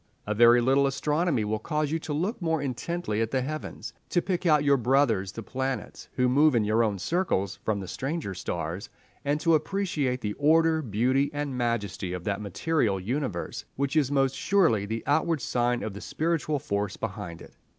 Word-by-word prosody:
A 105 - -1
very 120 +2 +6
little 135 +3 +3
astronomy 150 -2 0
will 110 +1 -1
cause 150 +1 -1
you 165 - 0
to 155 - -6
look 180 +10 -1
more 160 -2 +1
intently 140 -2 -2
at 115 - 0
the 130 0 0
heavens, 155 +3 -6 0.2
to 175 - +2
pick 180 0 -1
out 150 -2 +5
your 140 -1 +5
brothers 120 -6 +2
the 115 - -7
planets, 130 +3 -4
who 125 -1 +3
move 145 +2 +4
in 115 - +3
your 110 +2 +2
own 105 -3 0
circles, 100 - -1
from 105 -2 0
the 95 - -6
stranger 140 - -3
stars, 85 +1 -4 0.3
and 145 +1 0
to 165 - +3
appreciate 155 -6 0
the 105 -1 -2
order, 160 +2 +4
beauty, 130 +4 +1
and 145 -2 -2
majesty 105 -6 -2
of 90 -1 -5
that 100 +1 -2
material 105 - 0
universe 110 -2 -3
which 140 +2 -1
is 145 -3 +2
most 135 -2 +2
surely 165 - +2
the 110 +1 -3
outward 160 +2 +2
sign 120 -1 0
of 110 - -4
the 100 - -8
spiritual 160 -2 -1
force 100 -5 -2
behind 100 -7 -5
it. - - -14
130 Hz, 190 wpm, -27 LUFS, 105-155 Hz, 0.3 s, very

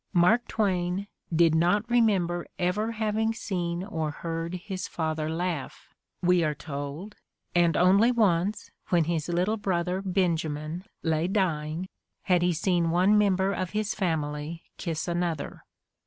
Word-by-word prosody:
Mark 205 +7 +4
Twain 190 -2 0 0.3
"did 165 -1 +4
not 180 +7 +2
remember 195 -8 +2
ever 205 +6 0
having 220 0 0
seen 175 -5 -2
or 160 -6 -2
heard 165 +3 -4
his 185 +1 -5
father 155 -1 -2
laugh," 165 -3 -4 0.3
we 180 -1 +4
are 150 -1 0
told, 145 +8 -6 0.4
and 170 -2 +3
only 195 +7 +5
once, 205 -3 +1 0.2
when 175 -4 +4
his 160 0 -2
little 180 +6 +1
brother 185 -2 -1
Benjamin 170 -3 -1 0.2
lay 160 +1 +1
dying, 170 -3 -1 0.4
had 180 -2 +3
he 180 0 +3
seen 170 0 +1
one 185 +5 +4
member 195 -2 +3
of 185 -1 -3
his 215 -1 0
family 160 -3 -2
kiss 165 -2 -3
another. 170 -3 -2
175 Hz, 135 wpm, -27 LUFS, 165-195 Hz, 0.4 s, only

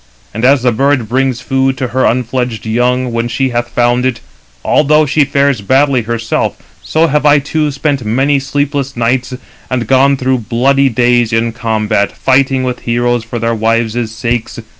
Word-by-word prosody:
And 110 - -5
as 130 0 +4
the 125 - +3
bird 135 0 +1
brings 130 +1 -1
food 135 0 0
to 125 -1 -3
her 130 +2 0
unfledged 125 -2 -2
young 125 +3 0
when 115 0 -1
she 130 +2 -1
hath 120 0 -2
found 120 +1 +1
it, 130 -2 -1 0.5
although 150 +1 +3
she 145 +1 +2
fares 140 -4 +1
badly 130 +4 +2
herself; 115 0 -2 0.2
so 160 +1 +1
have 150 -2 0
I 150 0 +5
too 150 +2 -1
spent 140 -2 -2
many 135 +6 +1
sleepless 140 -1 -2
nights, 125 +2 -1 0.3
and 125 -2 -1
gone 135 +3 +3
through 130 0 0
bloody 135 +4 +1
days 120 -1 +1
in 115 +1 0
combat, 110 -3 -1
fighting 130 0 +1
with 125 -1 -3
heroes 120 0 -1
for 115 +1 -6
their 115 0 -1
wives' 115 +1 -1
sakes. 115 +1 -3
125 Hz, 170 wpm, -13 LUFS, 115-135 Hz, 0.5 s, I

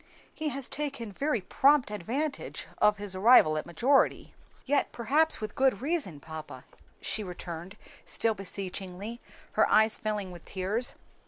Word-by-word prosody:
He 310 -1 -2
has 275 -3 -5
taken 275 -7 -4
very 275 +1 -1
prompt 275 +5 +3
advantage 265 - -3
of 210 0 +4
his 205 -1 -3
arrival 190 -6 +6
at 155 - -2
his - - -14
majority." 255 - +2 0.3
"Yet 285 +1 +1
perhaps 295 +7 +2
with 215 -1 -5
good 265 -1 +2
reason, 280 - -2
papa," 155 +1 -9 0.4
she 215 - -1
returned, 175 0 -7 0.3
still 225 -1 +1
beseechingly, 195 +2 -5 0.3
her - - +3
eyes 220 0 +4
filling 210 -3 -3
with 175 -2 -11
tears. 200 +6 -1
215 Hz, 145 wpm, -29 LUFS, 185-270 Hz, 0.4 s, arrival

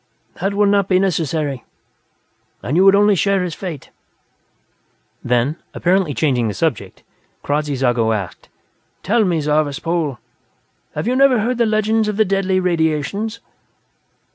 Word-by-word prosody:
"That 195 +2 -1
would 205 0 +3
not 200 -2 +2
be 185 - +3
necessary, 160 -7 -1 1.0
and 135 - -2
you 185 - +4
would 195 0 +7
only 205 +1 +4
share 195 0 +1
his 175 -3 -4
fate." 170 -7 -7 1.3
Then, 125 +6 0 0.2
apparently 180 -5 +1
changing 125 -7 +1
the 105 - -4
subject, 160 -9 -3 0.4
Kradzy 145 0 -1
Zago 120 -3 +1
asked: 100 -5 -5 0.5
"Tell 225 +4 +2
me, 175 -5 0
Zarvas 150 -1 0
Pol; 165 -6 -2 0.8
have - - -3
you 250 - +1
never 260 -4 +4
heard 240 +2 -1
the 235 - +3
legends 215 0 +1
of 210 -1 -2
the 220 - +4
Deadly 195 -1 0
Radiations?" 175 +5 -1
180 Hz, 140 wpm, -18 LUFS, 145-200 Hz, 1.3 s, would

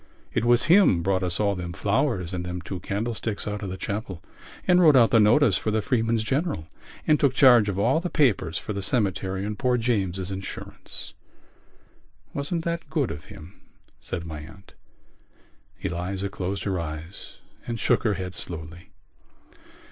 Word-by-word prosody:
It - - 0
was 120 0 +4
him 170 - +5
brought 95 0 +1
us 90 -2 -1
all 100 -1 +2
them 90 -2 -5
flowers 100 - 0
and 90 -1 -3
them 90 0 -4
two 95 +1 -6
candlesticks 110 +3 -3
out 105 0 -3
of 100 - -4
the 95 - -5
chapel 100 -4 -5 0.4
and 180 -1 +5
wrote 155 -5 +7
out 120 -3 +6
the 115 - +6
notice 110 +1 +5
for - - -2
the 110 +1 +1
Freeman's 115 -1 +1
General 135 - -1 0.4
and 150 -2 +4
took 135 -3 +2
charge 120 -7 +6
of 95 - -2
all 120 +10 +3
the 175 +1 -3
papers 105 - +2
for 105 - -4
the 100 - -3
cemetery 95 -3 0
and 105 0 -4
poor 125 -2 +2
James's 100 -6 -1
insurance." 95 0 -7 1.2
"Wasn't 160 +4 -2
that 170 -2 -3
good 150 -5 0
of 75 - -8
him?" 85 +5 -13 0.4
said 85 -2 -5
my 80 -2 -6
aunt. 95 +6 -13 1.1
Eliza 95 +2 -3
closed 95 +1 -4
her 95 -3 -1
eyes 80 +3 -7 0.3
and 115 -1 -3
shook - - +2
her 105 -3 +1
head 90 -1 -5
slowly. 85 0 -6
100 Hz, 170 wpm, -25 LUFS, 90-120 Hz, 1.2 s, wrote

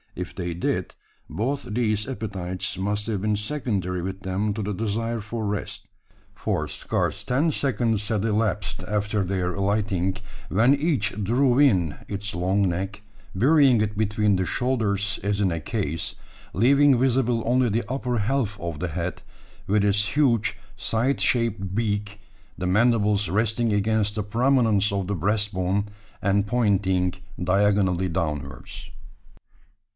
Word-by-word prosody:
If 90 0 -6
they 85 -2 -3
did, 85 - -2 0.4
both 135 +7 -2
these 105 -2 -1
appetites 95 -6 -4
must 105 +2 -1
have 105 -4 -1
been 105 0 +1
secondary 105 - -2
with 95 +2 -5
them 95 +2 -1
to 110 - -3
the 105 +1 -2
desire 115 +3 -2
for 110 +1 -4
rest; 100 0 -4 0.5
for - - -1
scarce - - -2
ten 145 +6 +1
seconds 115 -7 0
had 110 -2 0
elapsed 110 -3 0
after 105 0 -1
their 90 -1 -1
alighting, 100 -2 0 0.3
when 115 +7 +4
each 135 - 0
drew 125 +4 +3
in 95 - +3
its 100 0 -4
long 95 +3 +1
neck, 95 +4 -3 0.3
burying 135 +2 +5
it 105 -1 -1
between 105 -1 +2
the 95 0 0
shoulders 105 -4 0
as 100 0 0
in 95 -3 +2
a 85 -1 -3
case, 85 -6 -3 0.4
leaving 135 +5 +5
visible 125 -3 +2
only 125 +1 +3
the 110 +1 -1
upper 125 -2 -1
half 110 -1 -1
of 85 -3 -5
the 90 - -2
head, 85 +2 -4 0.5
with 105 +1 +2
its 105 +4 +1
huge 115 -7 +2 0.2
scythe 115 +6 0
shaped 110 -6 +1
beak 105 -1 -2 0.4
the 90 - -2
mandibles 105 -1 +3
resting 110 +4 +1
against 105 0 +1
the 105 - -1
prominence 115 -2 +2
of 100 -2 -2
the 100 - -1
breast 105 +4 0
bone, 95 +2 0 0.4
and 100 +1 +1
pointing 95 -6 +1 0.3
diagonally 95 -1 +2
downwards. 75 -5 -4
105 Hz, 140 wpm, -24 LUFS, 95-115 Hz, 0.5 s, burying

